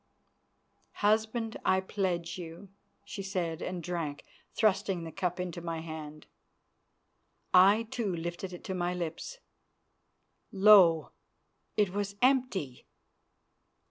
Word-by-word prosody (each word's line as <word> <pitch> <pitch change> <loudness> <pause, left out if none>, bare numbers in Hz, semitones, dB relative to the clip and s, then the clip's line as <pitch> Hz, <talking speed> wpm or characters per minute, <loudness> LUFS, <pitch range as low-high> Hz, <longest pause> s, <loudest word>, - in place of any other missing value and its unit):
"Husband, 220 +2 +1
I 190 0 +3
pledge 185 -3 -2
you," 170 +3 -9 0.4
she 205 0 -6
said, 180 -4 -3
and 180 -2 -4
drank, 165 -4 -4 0.3
thrusting 195 -4 +1
the 165 - -7
cup 180 0 -2
into 180 -1 -4
my 165 -1 -4
hand. 155 -2 -8 1.3
I, 195 +5 +6
too, 225 -2 -3
lifted 170 +3 -5
it 175 - -9
to 190 - -4
my 180 -1 -1
lips. 175 - -5 1.1
Lo! 190 -5 +6 0.7
it 205 -3 +3
was 200 0 -3
empty. 245 - +1
185 Hz, 110 wpm, -30 LUFS, 170-205 Hz, 1.3 s, I